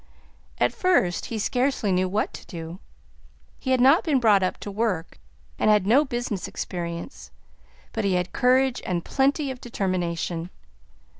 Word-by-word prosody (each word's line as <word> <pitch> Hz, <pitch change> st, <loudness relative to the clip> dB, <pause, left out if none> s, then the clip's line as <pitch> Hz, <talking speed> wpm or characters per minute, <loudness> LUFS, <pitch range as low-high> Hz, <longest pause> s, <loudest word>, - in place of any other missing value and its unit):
At 120 Hz, -, +2 dB
first 270 Hz, -, +1 dB
he 230 Hz, -, -4 dB
scarcely 250 Hz, -1 st, 0 dB
knew 185 Hz, 0 st, +1 dB
what 205 Hz, +3 st, -1 dB
to -, -, -9 dB
do; 165 Hz, +1 st, -7 dB, 0.8 s
he 260 Hz, -, -5 dB
had 260 Hz, -1 st, +3 dB
not 270 Hz, +7 st, +6 dB
been 295 Hz, -5 st, +2 dB
brought 215 Hz, -5 st, +4 dB
up 185 Hz, -, -1 dB
to 205 Hz, -, -5 dB
work, 200 Hz, -, -2 dB, 0.4 s
and -, -, +3 dB
had 210 Hz, -3 st, +4 dB
no 250 Hz, +8 st, +5 dB
business 240 Hz, -6 st, -3 dB
experience, 170 Hz, -, -6 dB, 0.6 s
but 225 Hz, -, -2 dB
he 195 Hz, -2 st, +1 dB
had 180 Hz, 0 st, -1 dB
courage 255 Hz, +1 st, +3 dB
and 175 Hz, -2 st, -2 dB
plenty 275 Hz, +1 st, +1 dB
of 255 Hz, -, -9 dB
determination. 175 Hz, -5 st, -2 dB
205 Hz, 155 wpm, -25 LUFS, 180-255 Hz, 0.8 s, not